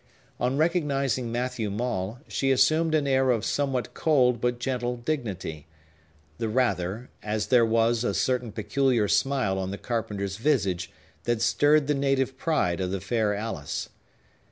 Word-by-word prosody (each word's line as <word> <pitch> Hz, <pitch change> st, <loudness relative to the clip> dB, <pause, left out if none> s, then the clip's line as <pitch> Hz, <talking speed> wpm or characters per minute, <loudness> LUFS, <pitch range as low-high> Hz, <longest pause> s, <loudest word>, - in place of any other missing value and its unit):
On 125 Hz, +2 st, 0 dB
recognizing 140 Hz, -7 st, 0 dB
Matthew 120 Hz, -2 st, -2 dB
Maule, 105 Hz, 0 st, -3 dB
she 135 Hz, -, -1 dB
assumed 155 Hz, +5 st, +3 dB
an 150 Hz, -2 st, +2 dB
air 135 Hz, -1 st, +2 dB
of 115 Hz, -4 st, +1 dB
somewhat 135 Hz, -3 st, -1 dB
cold 125 Hz, -7 st, +2 dB
but 120 Hz, 0 st, 0 dB
gentle 125 Hz, -1 st, -2 dB
dignity, 100 Hz, -, -4 dB, 0.7 s
the 115 Hz, -, -1 dB
rather, 110 Hz, -2 st, -1 dB
as 105 Hz, 0 st, -2 dB
there 125 Hz, -2 st, +6 dB
was 115 Hz, +1 st, +2 dB
a 100 Hz, -5 st, 0 dB
certain 125 Hz, +1 st, 0 dB
peculiar 115 Hz, +1 st, +1 dB
smile 125 Hz, -7 st, +1 dB
on 95 Hz, 0 st, -3 dB
the 100 Hz, -, -4 dB
carpenter's 100 Hz, -5 st, -3 dB
visage 100 Hz, -, 0 dB, 0.4 s
that 120 Hz, -1 st, +1 dB
stirred 145 Hz, +5 st, +3 dB
the 150 Hz, -, +1 dB
native 135 Hz, -1 st, 0 dB
pride 130 Hz, -, 0 dB
of 90 Hz, -, -1 dB
the 95 Hz, +1 st, -2 dB
fair 105 Hz, +2 st, 0 dB
Alice. 100 Hz, -9 st, -4 dB
120 Hz, 150 wpm, -26 LUFS, 105-135 Hz, 0.7 s, there